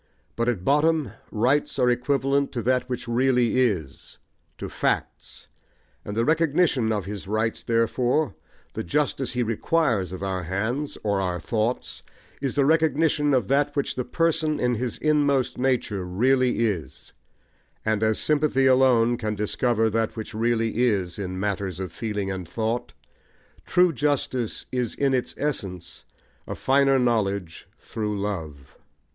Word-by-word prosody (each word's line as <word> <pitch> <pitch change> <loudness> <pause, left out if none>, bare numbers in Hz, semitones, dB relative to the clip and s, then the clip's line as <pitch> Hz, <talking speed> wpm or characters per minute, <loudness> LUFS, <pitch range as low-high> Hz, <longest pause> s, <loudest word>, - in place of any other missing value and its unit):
But 115 +1 0
at 95 -7 -2
bottom 150 -3 +2 0.2
rights 125 +8 +1
are 125 -2 +3
equivalent 135 +2 +1
to 120 - -3
that 125 +2 +1
which 125 -2 -4
really 125 0 +2
is, 90 - -2 0.4
to - - -5
facts; - - -3 0.6
and 105 +1 -6
the 115 - +2
recognition 155 -6 +2
of 105 -4 -1
his 100 -1 -6
rights 110 +2 -1
therefore, 120 +5 +1 0.4
the - - -4
justice 135 - -1
he 125 -1 0
requires 115 - 0
of 95 +1 -6
our 95 -1 -2
hands, 110 - -2
or 100 -2 +1
our 90 -2 -2
thoughts, 110 +6 -2 0.4
is 135 -3 -2
the 140 -2 +3
recognition 155 -1 +2
of 125 -7 +2
that 145 +1 +2
which 140 - 0
the 125 - -2
person, 160 0 0
in 125 0 +1
his 120 0 -3
inmost 145 -5 +1
nature, 125 -7 0
really 120 +6 +2
is; 95 -8 -4 0.7
and 110 -1 +1
as 110 -1 +2
sympathy 150 -3 +2
alone 125 -3 +4
can 110 -2 -3
discover 110 +2 +1
that 110 0 -1
which 110 +1 -6
really 115 0 0
is 100 -7 0
in 95 -2 -4
matters 100 -2 -2
of 95 -3 -4
feeling 105 -1 -3
and 95 -3 -6
thought, 115 +5 -2 0.7
true 180 -1 +4
justice 130 -4 -1
is 125 -3 -2
in 140 -1 +1
its 125 -2 -1
essence 90 - -4 0.4
a - - -4
finer 135 0 +3
knowledge 100 -8 -1
through 105 -2 -4
love. 80 -9 -5
120 Hz, 145 wpm, -25 LUFS, 105-135 Hz, 0.7 s, alone